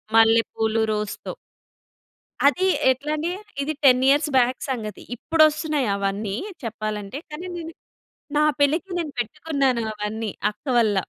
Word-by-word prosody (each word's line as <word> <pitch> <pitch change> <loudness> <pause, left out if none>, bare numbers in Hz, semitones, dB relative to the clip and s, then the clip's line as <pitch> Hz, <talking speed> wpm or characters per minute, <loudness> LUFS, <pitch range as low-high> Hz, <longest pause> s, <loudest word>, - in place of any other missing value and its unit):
మల్లెపూలు, 225 0 +3
రోస్‌తో. 210 -1 -3 1.1
అది 370 +6 +3 0.2
ఎట్లా 280 +4 -3
అంటే 325 +3 -2 0.3
ఇది 305 +3 -1
10 255 -1 +6
ఇయర్స్ 290 +2 +4
బ్యాక్ 250 +1 +2
సంగతి. 215 -6 -4
ఇప్పుడొస్తున్నాయి 310 -2 +2
అవన్నీ 200 +1 -2 0.3
చెప్పాలంటే. 215 +1 -4
కానీ 310 +5 -7
నేను 330 -1 -6 0.7
నా 300 - +4 0.2
పెళ్ళికి 310 +7 +2
నేను 320 -4 -3
పెట్టుకున్నాను 265 0 0
అవన్నీ 210 0 -4 0.2
అక్క 210 - -29
వల్ల. 215 -4 +3
250 Hz, 120 wpm, -23 LUFS, 215-300 Hz, 1.1 s, 10